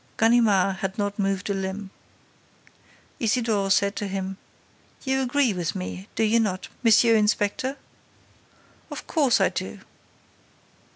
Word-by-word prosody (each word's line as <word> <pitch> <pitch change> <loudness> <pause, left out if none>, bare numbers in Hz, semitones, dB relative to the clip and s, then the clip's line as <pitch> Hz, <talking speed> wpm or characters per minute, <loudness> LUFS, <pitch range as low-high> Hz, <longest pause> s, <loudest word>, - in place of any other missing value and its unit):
Ganimard 215 -5 +3
had 190 +2 -4
not 205 0 -2
moved 195 -1 -1
a - - +1
limb. 190 +1 -4 1.3
Isidore 225 -4 +1
said 200 +1 +2
to 205 - -2
him: 190 0 -4 0.7
"You 265 -1 0
agree 260 -2 +2
with 175 -3 -3
me, 90 +1 -6
do - - +1
you 225 +2 +3
not, 190 -5 -2
M. 230 - +5 0.2
Inspector?" 215 +5 +1 1.1
"Of - - -7
course 285 -7 +2
I - - +3
do!" - - -6
205 Hz, 125 wpm, -25 LUFS, 195-230 Hz, 1.3 s, M